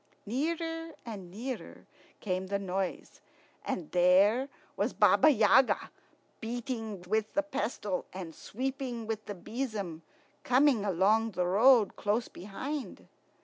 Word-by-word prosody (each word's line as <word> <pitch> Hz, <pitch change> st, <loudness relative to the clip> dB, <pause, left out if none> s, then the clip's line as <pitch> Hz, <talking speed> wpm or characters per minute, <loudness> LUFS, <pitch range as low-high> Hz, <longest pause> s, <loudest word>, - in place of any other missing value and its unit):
Nearer 325 Hz, +7 st, -2 dB
and 200 Hz, -6 st, -7 dB
nearer 235 Hz, +7 st, -7 dB, 0.4 s
came 185 Hz, -2 st, -2 dB
the 200 Hz, +1 st, 0 dB
noise, 190 Hz, -1 st, -4 dB, 0.4 s
and 165 Hz, -5 st, -4 dB
there 195 Hz, +9 st, +4 dB, 0.3 s
was -, -, -1 dB
Baba 310 Hz, -, +5 dB
Yaga, 240 Hz, 0 st, +4 dB, 0.5 s
beating 225 Hz, -4 st, -4 dB
with 215 Hz, +4 st, -1 dB
the 300 Hz, -, +2 dB
pestle 220 Hz, -9 st, -3 dB
and 180 Hz, -3 st, -7 dB
sweeping 255 Hz, -, -4 dB
with 215 Hz, -1 st, -4 dB
the 205 Hz, -, -5 dB
besom, 210 Hz, -5 st, -4 dB, 0.4 s
coming 255 Hz, -3 st, +4 dB
along 210 Hz, +4 st, +2 dB
the 180 Hz, 0 st, 0 dB
road 220 Hz, +4 st, +5 dB
close 215 Hz, +3 st, 0 dB
behind. 255 Hz, -, -6 dB
220 Hz, 115 wpm, -30 LUFS, 190-260 Hz, 0.5 s, Baba